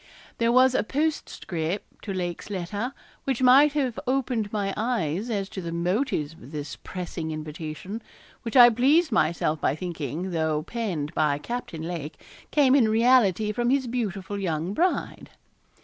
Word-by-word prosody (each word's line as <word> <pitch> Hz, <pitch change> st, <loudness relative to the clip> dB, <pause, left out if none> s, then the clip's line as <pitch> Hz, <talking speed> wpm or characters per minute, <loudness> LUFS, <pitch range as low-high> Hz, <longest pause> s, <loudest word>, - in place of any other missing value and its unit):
There 230 Hz, 0 st, +3 dB
was 255 Hz, +1 st, +5 dB
a -, -, +2 dB
postscript 205 Hz, -, -3 dB
to 205 Hz, -, -3 dB
Lake's 175 Hz, -1 st, -4 dB
letter 205 Hz, +5 st, -3 dB, 0.3 s
which 265 Hz, -2 st, -1 dB
might 275 Hz, +4 st, +7 dB
have 265 Hz, -6 st, -1 dB
opened 250 Hz, -5 st, 0 dB
my 200 Hz, -2 st, -1 dB
eyes 215 Hz, -3 st, -1 dB
as 200 Hz, -4 st, -1 dB
to 190 Hz, -, -6 dB
the 170 Hz, -1 st, -5 dB
motives 170 Hz, -, -1 dB
of 145 Hz, -4 st, -14 dB
this 145 Hz, -2 st, -5 dB
pressing 175 Hz, -3 st, -6 dB
invitation, 155 Hz, +6 st, -6 dB, 0.4 s
which 230 Hz, +3 st, -1 dB
I 240 Hz, -1 st, +10 dB
pleased 280 Hz, +8 st, +3 dB
myself 160 Hz, -6 st, +1 dB
by 135 Hz, -, +1 dB
thinking, 165 Hz, +1 st, -4 dB
though 160 Hz, -2 st, 0 dB
penned 175 Hz, -8 st, -3 dB
by 150 Hz, -2 st, +2 dB
Captain 170 Hz, -3 st, -5 dB
Lake, 160 Hz, -3 st, -5 dB, 0.3 s
came 275 Hz, -3 st, +4 dB
in 250 Hz, -6 st, +5 dB
reality 220 Hz, -3 st, +4 dB
from 240 Hz, +2 st, 0 dB
his 270 Hz, 0 st, +2 dB
beautiful 205 Hz, -5 st, -3 dB
young 170 Hz, -1 st, -2 dB
bride. 355 Hz, -, -1 dB
200 Hz, 150 wpm, -26 LUFS, 165-245 Hz, 0.4 s, I